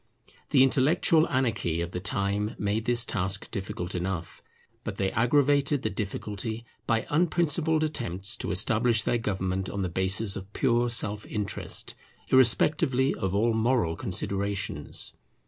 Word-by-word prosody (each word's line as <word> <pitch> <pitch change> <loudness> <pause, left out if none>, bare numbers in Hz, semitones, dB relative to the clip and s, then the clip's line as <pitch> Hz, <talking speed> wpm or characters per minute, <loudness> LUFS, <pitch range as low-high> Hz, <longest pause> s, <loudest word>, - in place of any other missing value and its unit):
The 135 -2 +5
intellectual 155 +5 +3
anarchy 110 -10 0
of 85 +1 -3
the 90 - -3
time 100 +3 -1
made 105 +2 -1
this 120 -1 +2
task 95 -1 -3
difficult 95 -3 -4
enough; 90 -2 -4 0.4
but - - -4
they 95 -1 0
aggravated 140 +3 +2
the 110 - -1
difficulty 105 +3 -4 0.2
by 115 -1 +1
unprincipled 160 0 +2
attempts 105 - -3
to - - -4
establish 110 +5 +2
their 120 - +1
government 95 -3 -2
on 100 -1 -3
the 90 - -1
basis 95 +3 0
of 95 +1 -8
pure 120 -2 +2
self 110 -3 +1
interest, 105 -2 -2 0.4
irrespectively 130 +1 +4
of 95 -2 -2
all 115 +3 +2
moral 110 -7 +1
considerations. 95 -3 -3
110 Hz, 135 wpm, -27 LUFS, 95-125 Hz, 0.4 s, The